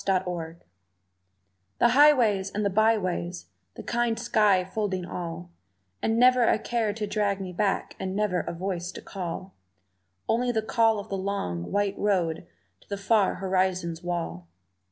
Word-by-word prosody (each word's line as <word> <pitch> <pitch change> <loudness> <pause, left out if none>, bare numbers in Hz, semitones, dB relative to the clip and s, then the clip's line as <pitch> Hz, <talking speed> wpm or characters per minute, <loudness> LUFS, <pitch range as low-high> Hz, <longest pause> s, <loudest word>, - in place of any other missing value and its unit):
Wanderlust 175 -3 -2 1.1
THE 240 - +4
highways 240 -8 +5
and 205 +1 -2
the 200 - +1
byways, 185 - 0 0.2
the - - -8
kind 235 -1 0
sky 210 -6 +3
folding 190 -2 -2
all, 175 0 -6 0.5
And 225 0 +1
never 250 +1 +5
a 230 - +4
care 225 -1 -1
to 210 +1 -3
drag 205 -1 0
me 185 -2 -6
back 195 +2 -1
and 190 0 -3
never 205 -3 +1
a - - -4
voice 180 0 -4
to - - -8
call; 185 0 -6 0.7
Only 245 +2 +1
the 220 -2 -1
call 225 0 +3
of 205 +1 -7
the 195 - -2
long, 140 - -3
white 200 -1 0
road 175 -6 0 0.3
to - - -26
the 200 - -3
far 200 0 +2
horizon's 185 -3 -1
wall. 165 - -4
195 Hz, 155 wpm, -27 LUFS, 180-220 Hz, 1.1 s, highways